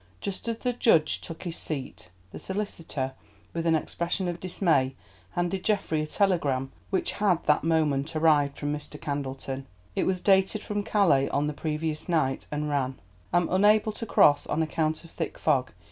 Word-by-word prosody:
Just 200 +3 -5
as 230 -1 -1
the 250 +1 -1
judge 165 -10 +3
took 165 - -8
his 170 -3 -5
seat, 140 -4 -5 0.2
the - - -8
solicitor, 165 -9 -4 0.4
with 170 0 -1
an 165 - +4
expression 170 +4 -1
of 175 -1 -3
dismay, 160 -8 +1 0.4
handed 175 +2 -1
Geoffrey 195 -7 +1
a 155 - -3
telegram 150 -9 +1 0.2
which 190 - 0
had 195 -5 +1
that 150 - +3
moment 155 -2 +1
arrived 150 -3 +3
from 145 0 -2
Mr. 150 0 -7
Candleton. 135 -1 -4 0.3
It - - +1
was 185 -1 +1
dated 195 +2 +3
from 205 0 -2
Calais 170 -10 +3
on 145 +1 +1
the 150 - -2
previous 155 +2 -3
night, 155 -6 +1
and 150 0 -2
ran, 135 -3 -1 0.3
"Am 175 0 +3
unable 210 +3 +4
to 230 +2 -7
cross 145 -6 +5
on 160 - +1
account 155 0 -1
of 165 - -14
thick - - -4
fog. 135 -5 +1
160 Hz, 175 wpm, -27 LUFS, 145-190 Hz, 0.4 s, cross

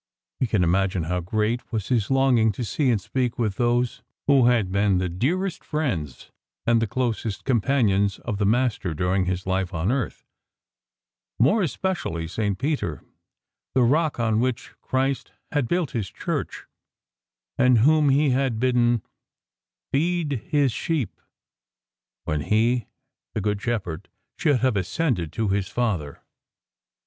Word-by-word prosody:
We 130 - +1
can 105 -5 +2
imagine 95 0 +1
how 90 +3 -1
great 110 +8 -1
was 110 -4 -3
his 115 -5 +1
longing 130 -5 +4
to 120 - -4
see 135 +4 0
and 115 -4 +3
speak 125 +4 -2
with 105 -5 -1
those 120 0 +1 0.2
who 135 -4 +5
had 115 -7 +2
been 100 -1 +2
the 90 0 0
dearest 170 - -1
friends 90 - -3 0.3
and 115 -1 +3
the 115 - +1
closest 115 -2 -2
companions 110 -6 +2
of 105 -4 -4
the 100 - +2
Master 110 -7 +1
during 90 +3 +1
His 90 +1 -2
life 95 -1 -1
on 85 +7 0
earth, 130 -3 -3 1.1
more 145 - +4
especially 150 - -2
St. 100 +2 -1
Peter, 130 - -2 0.7
the 130 - +5
rock 150 +3 +2
on 110 -2 +2
which 125 0 -1
Christ 135 -1 -1 0.2
had 145 -5 0
built 175 -3 0
His 110 -6 -3
Church, - - -4 0.9
and 125 -1 +5
whom 150 +5 +4
He 140 +1 +3
had 130 -3 0
bidden 120 -2 +2 0.4
" - - -68
feed 155 -4 0
His 145 -5 +2
sheep 155 - -2 0.5
" - - -68
when 75 -1 -1
He, 115 +5 +1 0.5
the - - 0
Good 105 0 -1
Shepherd, 100 -7 -3 0.3
should 145 -7 +2
have 130 -3 +2
ascended 100 - -1
to 110 -3 -1
His 100 -1 0
Father. 95 -13 -2
115 Hz, 145 wpm, -24 LUFS, 100-130 Hz, 1.1 s, who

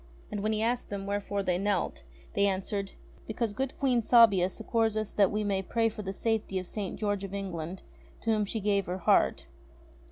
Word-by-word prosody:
And 205 -1 -3
when 215 +1 0
he 215 0 0
asked 240 +2 -1
them 200 -1 -4
wherefore 200 0 -2
they 180 -1 +1
knelt, 200 -2 -1 0.3
they 200 0 +3
answered: 195 +1 -2 0.3
"Because 220 -1 -2
good 265 +4 -3
Queen 255 -4 +2
Sabia 210 -6 +6
succours 225 +2 0
us 215 -1 -2
that 200 -2 +4
we 210 +1 -1
may 200 -2 0
pray 225 +4 +1
for 215 0 -7
the 195 -2 -4
safety 215 -1 -1
of 185 - -3
St. 200 +1 -4
George 205 -2 -1
of 195 0 -5
England, 185 -2 -5 0.4
to 225 - 0
whom 215 -1 +2
she 215 +2 -3
gave 200 -1 +1
her 180 +1 -2
heart." 180 - +3
205 Hz, 200 wpm, -29 LUFS, 195-220 Hz, 0.4 s, Sabia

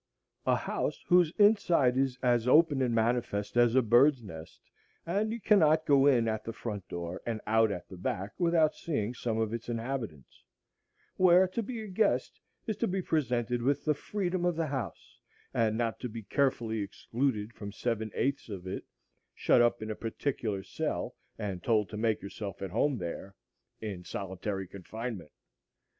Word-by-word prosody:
A - - +5
house - - -2
whose 175 -3 +5
inside 185 - +4
is 130 -1 +1
as 120 -1 +2
open 150 0 +5
and 120 -3 +1
manifest 115 -3 0
as 120 0 +4
a 130 - +5
bird's 120 +3 +5
nest, 80 -6 -10 0.5
and 205 +6 0
you 230 - -3
cannot 160 -7 +4
go 140 -1 +5
in 120 -5 +4
at 110 -1 -1
the 115 - -4
front 105 -5 -5
door 85 +1 -5
and 115 -2 -3
out 110 0 +3
at 90 -3 -5
the 95 - -10
back 95 +3 -3
without 170 -3 +3
seeing 120 -8 -2
some 115 -2 -2
of 110 -1 0
its 115 +1 -5
inhabitants; 115 - -5 0.7
where 185 0 +6
to 210 +5 -2
be 230 +1 -5
a - - -7
guest 205 +2 0 0.3
is 220 -4 -2
to 230 - 0
be 190 0 -1
presented 125 -7 0
with 140 +3 0
the 155 - +3
freedom 185 +2 -2
of 175 -1 +2
the 165 0 0
house, 130 - -5 0.3
and 110 -1 +1
not 115 -1 -1
to 125 - -4
be 115 0 -7
carefully 115 -3 0
excluded 110 +2 -2
from 100 -2 -7
seven 110 0 -2
eighths 140 -3 -1
of 95 -3 -6
it, 95 - -4 0.5
shut - - +4
up 120 -1 +2
in 110 - -4
a - - -3
particular 115 -4 -3
cell, - - -3 0.2
and 100 -4 -4
told 105 -5 +2
to - - -7
make 110 -1 0
yourself 100 0 -6
at 95 - -4
home 130 +6 +1
there,—in 95 +1 -8
solitary 95 +1 -4
confinement. 100 -1 -6
120 Hz, 175 wpm, -30 LUFS, 105-150 Hz, 0.7 s, where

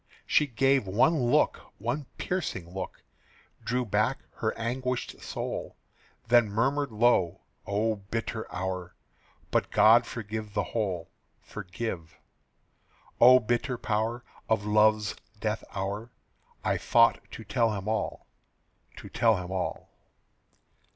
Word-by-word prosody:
She 150 - +3
gave 135 -2 +2
one 120 - +3
look, - - +3 0.2
one 145 -2 -3
piercing 95 - -3
look, 95 - -6 0.6
Drew 125 +1 0
back 110 +5 0
her 110 - 0
anguished 125 +2 -3
soul, - - -5 0.5
Then 120 -2 +5
murmured 135 +6 0
low, 105 -6 +2 0.3
"O 105 +2 0
bitter 110 +2 -4
hour! 90 -1 -4 0.6
But - - +1
God 115 +2 +6
forgive 110 -2 -6
the 105 - +2
whole 95 -4 -3 0.3
Forgive 90 -5 -6 1.0
O 125 +1 +9
bitter 120 +2 -1
power 115 +2 -1 0.3
Of 110 -2 +1
love's 105 0 +3 0.2
death - - -2
hour, 100 +5 -4 0.5
I - - +1
thought 115 0 +4
to 115 - -7
tell 110 +2 +1
him 100 0 -5
all, 110 -2 -2 0.7
To - - -10
tell 115 -3 +3
him 90 0 -6
all." 95 -1 -3
110 Hz, 115 wpm, -28 LUFS, 100-120 Hz, 1.0 s, O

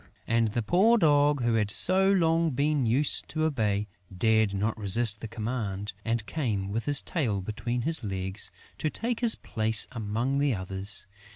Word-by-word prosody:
And 115 0 +1
the 115 +2 -2
poor 200 - +3
Dog, 145 - +3
who 120 -1 +1
had 105 -2 0
so 190 - +2
long 165 -3 +2
been 140 -1 0
used 135 +6 -1
to 155 0 -2
obey, 105 -9 -1 0.3
dared 110 0 +2
not 105 +3 -2
resist 110 +1 +3
the 115 - -5
command 105 -3 -4
and 115 -2 -2
came, 105 -11 -3
with 115 +2 -3
his 145 -1 +5
tail 120 - -2
between 115 +5 -4
his 160 -3 0
legs, 95 0 -3 0.3
to 155 - -1
take 235 +7 -3
his 235 -3 +3
place 110 0 +3
among 115 +4 -2
the 140 -4 +1
others. 95 +2 -1
115 Hz, 170 wpm, -27 LUFS, 105-150 Hz, 0.3 s, his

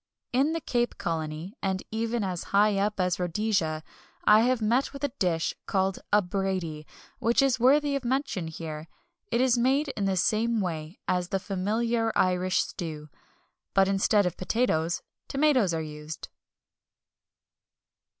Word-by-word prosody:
In 275 +5 +3
the 330 - -1
Cape 240 -3 -1
Colony, 160 +2 -3
and 190 -1 -1
even 225 +1 -1
as 180 -3 -3
high 205 +1 +3
up 210 0 0
as 180 -1 +1
Rhodesia, 175 -3 0 0.4
I 210 0 +7
have 250 +2 +2
met 235 +6 +1
with 275 - -9
a 285 - 0
dish 165 -3 +1
called 190 -1 0
a 210 0 +5
Brady, 180 -5 -3 0.3
which 230 +1 +2
is 260 -2 +2
worthy 280 +3 +4
of 275 - -2
mention 250 - -1
here. 160 -1 -6 0.4
It 235 - +1
is 255 -2 +3
made 270 +4 +2
in 210 -6 -2
the 190 -1 +1
same 225 +4 +2
way 165 -3 -4
as 180 -1 0
the 195 - +1
familiar 225 +4 0
Irish 185 0 +2
stew; 155 -3 -6 0.7
but 195 -1 +5
instead 195 +1 +3
of 180 - -2
potatoes 175 -6 0 0.2
tomatoes 275 - +3
are 160 -1 -1
used. 150 +1 -8
195 Hz, 150 wpm, -27 LUFS, 175-235 Hz, 0.7 s, I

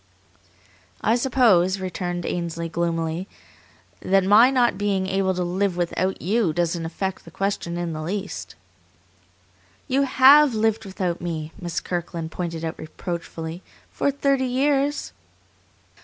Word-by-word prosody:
"I 220 - +2
suppose," 225 -8 +3
returned 175 -2 -4
Ainsley 170 -1 -3
gloomily, 165 +1 -2 0.7
"that 195 0 +2
my 210 +6 +7
not 250 -5 +2
being 195 -1 0
able 190 0 0
to 180 - -1
live 180 +1 -1
without 180 +2 -1
you 200 -2 +1
doesn't 170 -1 -1
affect 190 +3 -4
the - - -12
question 195 -3 -2
in 175 -1 -3
the 155 - -5
least?" 195 +5 -5 1.3
"You 270 0 +2
HAVE 275 0 +6
lived 220 0 +1
without 185 -3 -3
me," 160 -2 -4
Miss 175 -2 -2
Kirkland 170 -2 -4
pointed 165 -2 -4
out 160 - -5
reproachfully, 165 +1 -6 0.3
"for - - 0
thirty 275 -1 +1
years." 280 +3 0
185 Hz, 125 wpm, -23 LUFS, 170-220 Hz, 1.3 s, my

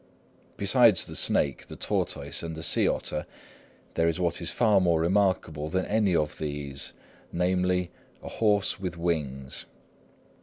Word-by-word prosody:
Besides 105 -1 +4
the - - -8
snake, 70 -3 +1
the - - -9
tortoise, - - -1
and 80 -1 -5
the 80 - -7
sea - - +3
otter, 75 - -2 0.7
there 85 - +2
is 85 +1 0
what 85 -3 -1
is - - 0
far 105 -5 +3
more 85 -3 +2
remarkable 85 -4 +1
than 95 +3 -1
any 105 -4 +2
of 75 -2 -1
these, 70 -2 -4 0.4
namely, 90 0 0 0.3
a - - -8
horse 105 -2 +1
with 90 -3 -4
wings. 70 -6 -2
85 Hz, 145 wpm, -27 LUFS, 80-95 Hz, 0.7 s, Besides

